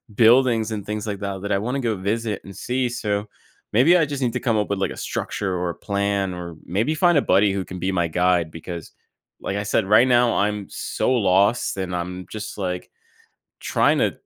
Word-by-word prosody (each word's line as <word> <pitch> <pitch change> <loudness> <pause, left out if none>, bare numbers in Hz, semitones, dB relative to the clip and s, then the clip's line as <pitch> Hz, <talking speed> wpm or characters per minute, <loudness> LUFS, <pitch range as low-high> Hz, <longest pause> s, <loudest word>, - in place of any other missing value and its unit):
buildings, 115 -1 +4
and 105 -3 -4
things 105 +1 -4
like 100 -2 -3
that, 100 -2 -4
that 100 - -3
I - - +3
wanna 125 +6 -2
go 115 -3 0
visit 105 +2 -2
and 100 - -11
see, 125 0 -1
so, 105 -3 -2 0.5
maybe 150 +11 +6
I 165 - +3
just 140 -1 -5
need 120 - 0
to - - -1
come 115 -4 0
up 105 - -1
with, 100 -1 -1
like, 95 - 0
a - - -8
structure, 95 -2 -3
or 90 0 -1
a - - -10
plan, 100 -1 -1
or 85 -2 -7
maybe 110 - 0
find 175 -2 +4
a - - +4
buddy 100 -4 +3
who 95 - -2
can 90 - -8
be 95 +2 -1
my 85 -2 +1
guide, 90 0 +1
because, 85 0 -8 0.5
like 100 - -3
I 100 - -2
said, 105 +1 +1
right 105 +5 +5
now, 120 -1 +4
I'm 105 -1 0
so - - -2
lost, 100 -1 +2
and 95 -2 -3
I'm 90 +1 -4
just, 110 -1 -6
like, 90 -2 -3 0.7
trying - - +2
to - - +2
100 Hz, 220 wpm, -22 LUFS, 95-115 Hz, 0.7 s, maybe